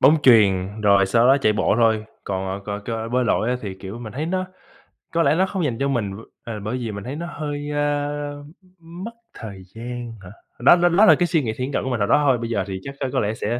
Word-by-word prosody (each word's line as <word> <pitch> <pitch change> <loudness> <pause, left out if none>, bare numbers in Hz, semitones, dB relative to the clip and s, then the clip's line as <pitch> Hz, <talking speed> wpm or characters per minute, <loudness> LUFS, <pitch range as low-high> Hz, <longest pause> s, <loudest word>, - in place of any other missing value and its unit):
bóng 155 - +6
chuyền, 100 -4 +4
rồi 100 -2 +4
sau 115 +5 +3
đó 135 +2 +6
chạy 110 -5 +3
bộ 105 - +1
thôi. 110 -2 +3 0.2
Còn, 95 0 -3
ờ, 105 0 -4
c - - -22
cơ 115 -1 -3
bơi 125 0 +2
lội 110 +1 +1
á 125 - +1
thì, 100 -3 -5
kiểu, 95 +4 -8
mình 110 -3 -8
thấy 150 +5 -3
nó 185 +1 -1 0.7
có 165 0 +3
lẽ 150 - +3
nó 190 +2 +3
không 190 -3 -3
dành 120 -5 -1
cho 140 - +1
mình, 120 -8 -1
m 95 - -7 0.3
ờ, 110 -3 -6
bởi 110 +5 -3
vì 115 -3 -4
mình 100 -1 -6
thấy 130 +4 -5
nó 170 +3 -5
hơi, 145 -2 -5
ơ, 145 0 -2 0.4
mất 170 +6 -8 0.2
thời 100 -4 -9
gian 120 0 -6
hả? 90 - -10 0.3
Đó 130 +7 +7
đó 175 0 +3
đó 195 +6 +5
là - - +8
cái 175 - +1
suy 160 -3 +2
nghĩ 110 -3 -2
thiển 130 +2 -3
cận - - 0
của 130 - -3
mình 125 -3 -1
hồi 100 - +1
đó 150 - +4
thôi, 135 -3 +4
bây 115 0 -5
giờ 100 -5 0
thì 95 -1 -4
chắc 140 0 -7
có 130 - -2
có - - +2
lẽ 105 0 0
sẽ 115 +2 -2
120 Hz, 275 wpm, -22 LUFS, 105-145 Hz, 0.7 s, là